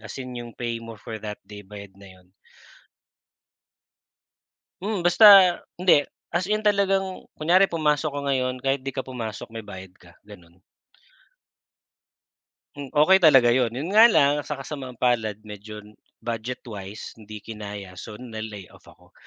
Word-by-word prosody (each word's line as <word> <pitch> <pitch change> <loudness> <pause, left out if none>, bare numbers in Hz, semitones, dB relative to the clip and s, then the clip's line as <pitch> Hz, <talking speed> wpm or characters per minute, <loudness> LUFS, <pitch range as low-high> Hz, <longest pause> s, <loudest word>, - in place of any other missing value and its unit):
As 110 - -10
in 130 -1 -7
yung 120 -1 -8
pay 120 -1 -4
mo 115 -1 -10
for 110 +1 -8
that 105 -1 -7
day 105 0 -11
bayad 100 0 -12
na 100 - -13
'yon. 90 0 -20 2.5
Mm, 205 -1 -2
basta, 175 +5 +5 0.5
hindi. 175 -5 +4 0.2
As 175 +1 -1
in, 215 +1 -1
talagang 195 -2 0
kunyari 180 +5 +3
pumasok 155 -3 0
ka 145 - -3
ngayon, 130 -1 0
kahit 135 -1 -1
'di 135 - -4
ka - - -3
pumasok 115 -5 -7
may 115 0 -8
bayad 95 -1 -10
ka, 90 - -19 0.2
gano'n. 90 -4 -16 2.2
Mm, 140 -2 -8
okey 185 +6 +5
talaga 135 -6 +7
'yon. 125 -3 +1
'Yon 140 +8 -5
nga 225 +2 +9
lang, 145 -4 +4
sa 145 -2 -6
kasamaang-palad, 125 -6 -2
medyo 105 +1 -11 0.2
budget 115 +2 -5
wise, 105 -1 -8
hindi 110 -1 -11
kinaya, 105 -3 -8
so 105 +3 -9
na-layoff 110 -6 -9
ako. - - -22
120 Hz, 145 wpm, -24 LUFS, 105-150 Hz, 2.5 s, nga